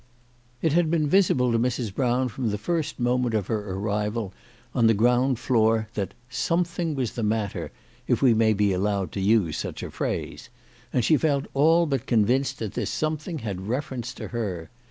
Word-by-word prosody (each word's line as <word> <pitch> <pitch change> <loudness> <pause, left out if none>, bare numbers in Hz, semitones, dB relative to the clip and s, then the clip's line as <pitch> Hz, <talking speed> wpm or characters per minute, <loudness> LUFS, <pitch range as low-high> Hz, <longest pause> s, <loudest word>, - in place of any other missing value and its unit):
IT 160 -3 +2
had 170 -1 +3
been 155 -2 +1
visible 145 -9 +3
to 115 - +2
Mrs. 120 -3 -1
Brown 125 +2 +1
from 120 0 -3
the 105 - -1
first 155 +5 -2
moment 125 -1 +1
'of 105 -3 0
her 105 -2 -3
arrival 105 +1 -2 0.4
on 115 -2 +4
the 115 - +4
ground 125 +4 +3
floor 110 -3 +2
that 100 -4 -3
" 120 - -34 0.2
some 170 +1 +3
thing 170 -2 -3
was 130 -4 -1
the 120 - -4
matter/' 105 -2 -1 0.4
if - - +2
we 130 -4 +5
may 110 0 +3
be 100 -2 +2
allowed 100 0 -1
to 100 - -4
use 95 -6 +2
such - - -5
a - - -6
phrase; - - -4 0.4
and 125 - +1
she 155 - +5
felt 140 -3 +1
all 165 +5 +4
but 135 -6 -2
convinced 130 +4 +2
that 110 -3 -5
this - - -2
something 155 +2 -2
had 95 -2 -4
reference 125 -1 -3
to - - -7
her. 95 -9 -4
120 Hz, 195 wpm, -25 LUFS, 105-140 Hz, 0.4 s, we